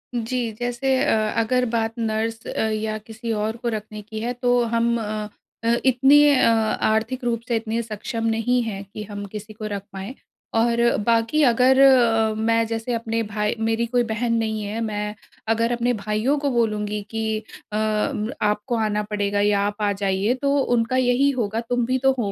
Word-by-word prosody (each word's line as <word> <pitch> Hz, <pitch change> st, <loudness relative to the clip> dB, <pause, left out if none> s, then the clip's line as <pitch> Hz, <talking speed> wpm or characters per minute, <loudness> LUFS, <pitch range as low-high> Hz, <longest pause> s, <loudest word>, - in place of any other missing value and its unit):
जी, 235 Hz, 0 st, -2 dB
जैसे 245 Hz, +2 st, 0 dB
अ, 215 Hz, -1 st, +1 dB
अगर 250 Hz, +2 st, +1 dB
बात 225 Hz, -1 st, -1 dB
नर्स 225 Hz, 0 st, -2 dB
अ, -, -, -2 dB
या 215 Hz, 0 st, -2 dB
किसी 225 Hz, +1 st, -7 dB
और 215 Hz, +1 st, -2 dB
को 240 Hz, 0 st, -2 dB
रखने 215 Hz, -1 st, -5 dB
की 215 Hz, +1 st, -7 dB
है 240 Hz, +3 st, -2 dB
तो 245 Hz, 0 st, +2 dB
हम 235 Hz, 0 st, +2 dB
अ 215 Hz, 0 st, -3 dB, 0.4 s
अ, 230 Hz, +1 st, +3 dB
इतने 270 Hz, +3 st, +5 dB, 0.2 s
अ, 255 Hz, -, +4 dB
आर्थिक 225 Hz, +2 st, 0 dB
रूप 230 Hz, -1 st, -1 dB
से 235 Hz, -, 0 dB
इतने 225 Hz, +1 st, -1 dB
सक्षम 225 Hz, +1 st, -4 dB
नहीं 240 Hz, +2 st, +1 dB
हैं 200 Hz, -3 st, -5 dB
कि 210 Hz, -, -5 dB
हम 205 Hz, 0 st, -7 dB
किसी 210 Hz, +1 st, -8 dB
को 215 Hz, 0 st, -7 dB
रख 200 Hz, -2 st, -4 dB
पाएँ। 195 Hz, +6 st, -6 dB, 0.4 s
और 235 Hz, +1 st, +2 dB, 0.2 s
बाकी 230 Hz, +6 st, +2 dB
अगर 255 Hz, +2 st, +4 dB
अ, 230 Hz, -5 st, +5 dB
मैं 230 Hz, +1 st, +2 dB
जैसे 225 Hz, +2 st, -3 dB
अपने 230 Hz, 0 st, -1 dB
भाई 210 Hz, +2 st, -1 dB
मेरी 225 Hz, +1 st, 0 dB
कोई 245 Hz, +1 st, +1 dB
बहन 230 Hz, +1 st, 0 dB
नहीं 220 Hz, -1 st, -1 dB
है, 210 Hz, +2 st, -4 dB
मैं 210 Hz, -1 st, -3 dB, 0.3 s
अगर 230 Hz, +1 st, +2 dB
अपने 240 Hz, +1 st, +1 dB
भाइयों 215 Hz, +8 st, +1 dB
को 285 Hz, -1 st, 0 dB
बोलूँगी 210 Hz, -3 st, 0 dB
कि 220 Hz, -1 st, -1 dB, 0.3 s
अ, -, -, -4 dB
आपको 215 Hz, +1 st, -1 dB
आना 210 Hz, -1 st, 0 dB
पड़ेगा 205 Hz, -1 st, -1 dB
या 205 Hz, -1 st, +3 dB
आप 205 Hz, +1 st, -5 dB
आ 205 Hz, -1 st, +2 dB
जाइए 195 Hz, +3 st, 0 dB
तो 280 Hz, 0 st, +2 dB, 0.2 s
उनका 230 Hz, +3 st, 0 dB
यही 255 Hz, +2 st, +3 dB
होगा 220 Hz, 0 st, -1 dB
तुम 245 Hz, -1 st, +1 dB
भी 255 Hz, +1 st, +1 dB
तो 270 Hz, -, +7 dB
हो 205 Hz, -4 st, -1 dB
225 Hz, 185 wpm, -23 LUFS, 215-240 Hz, 0.4 s, तो